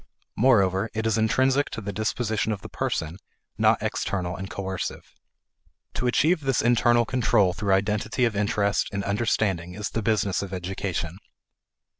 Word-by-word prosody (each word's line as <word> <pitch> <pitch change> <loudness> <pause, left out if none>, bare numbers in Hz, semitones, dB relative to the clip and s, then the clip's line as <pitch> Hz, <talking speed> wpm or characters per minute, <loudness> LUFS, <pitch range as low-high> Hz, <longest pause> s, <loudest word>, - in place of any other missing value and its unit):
Moreover 100 -4 +3
it 110 0 -2
is 115 0 +1
intrinsic 130 +5 +2
to - - -5
the 100 -2 -5
disposition 110 +1 -1
of 100 -3 -4
the - - -8
person, 80 +2 -3 0.4
not - - +3
external 90 -2 -2
and 95 +2 -6
coercive. 95 -4 -5 0.8
To 125 - -1
achieve 160 +8 +3
this 135 -3 0
internal 120 0 +4
control 110 -6 +2
through 100 0 0
identity 105 +5 0
of 115 -3 -1
interest 100 0 +1
and 100 -1 -3
understanding 100 -4 0
is 105 -1 -4
the 115 - -2
business 105 -2 +1
of 100 -1 -6
education. 90 -1 -4
105 Hz, 150 wpm, -25 LUFS, 95-115 Hz, 0.8 s, internal